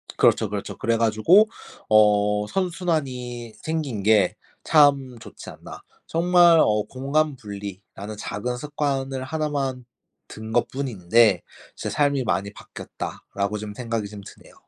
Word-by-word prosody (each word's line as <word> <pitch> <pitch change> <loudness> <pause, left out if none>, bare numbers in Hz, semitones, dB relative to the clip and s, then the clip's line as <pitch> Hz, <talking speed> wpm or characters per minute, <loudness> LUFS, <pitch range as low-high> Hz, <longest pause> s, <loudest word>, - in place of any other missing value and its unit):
그렇죠, - - +3
그렇죠. - - -5
그래 115 0 0
가지고 115 - +4 0.4
어 105 -1 +4
'선순환이 135 - -3
생긴 150 -10 -3
게 105 -3 +3 0.3
참 140 -5 +3
좋지 - - -11
않나.' - - -11 0.3
정말 175 0 +5
어 105 -4 +3
공간 140 +2 0
분리라는 100 0 -8
작은 125 +5 -4
습관을 135 -2 -3
하나만 140 -4 -3 0.4
든 110 0 -9
것뿐인데 115 -6 +2 0.3
'제 - - -5
삶이 140 -3 +1
많이 100 +2 -1
바뀌었다.'라고 100 +1 -6
좀 105 -1 -7
생각이 115 -3 -3
좀 105 -1 -9
드네요. - - -15
125 Hz, 265 characters per minute, -23 LUFS, 105-145 Hz, 0.4 s, 정말